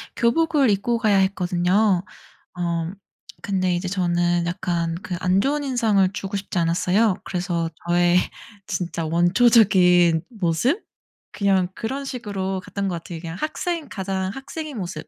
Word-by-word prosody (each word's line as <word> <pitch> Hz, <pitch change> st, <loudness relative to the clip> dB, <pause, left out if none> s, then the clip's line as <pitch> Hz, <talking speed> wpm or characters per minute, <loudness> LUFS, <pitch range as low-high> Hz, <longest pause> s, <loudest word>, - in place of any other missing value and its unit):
교복을 285 Hz, +2 st, +2 dB
입고 220 Hz, +4 st, +1 dB
가야 210 Hz, -4 st, +3 dB
했거든요. 185 Hz, +1 st, +2 dB, 0.6 s
어 170 Hz, -1 st, -1 dB, 0.6 s
근데 185 Hz, -2 st, +1 dB
이제 180 Hz, +1 st, -2 dB
저는 175 Hz, -2 st, +1 dB
약간 170 Hz, -2 st, -2 dB
그 180 Hz, -, -4 dB
안 185 Hz, +2 st, +2 dB
좋은 290 Hz, +1 st, 0 dB
인상을 220 Hz, -8 st, +2 dB
주고 195 Hz, 0 st, -3 dB
싶지 190 Hz, -2 st, -4 dB
않았어요. 180 Hz, +5 st, +2 dB
그래서 175 Hz, -2 st, -2 dB, 0.2 s
저의 175 Hz, 0 st, +3 dB, 0.5 s
진짜 170 Hz, -2 st, -3 dB
원초적인 180 Hz, -2 st, +4 dB
모습? 215 Hz, -, 0 dB, 0.5 s
그냥 195 Hz, -3 st, +2 dB
그런 270 Hz, +5 st, -4 dB
식으로 195 Hz, -7 st, -4 dB
갔던 200 Hz, -1 st, -3 dB
것 180 Hz, -, -2 dB
같아요, 170 Hz, -2 st, -7 dB
그냥 165 Hz, 0 st, -7 dB
학생 330 Hz, 0 st, -3 dB
가장 190 Hz, -1 st, -3 dB
학생인 280 Hz, +2 st, -7 dB
모습. 175 Hz, -5 st, -6 dB
190 Hz, 285 characters per minute, -23 LUFS, 175-225 Hz, 0.6 s, 원초적인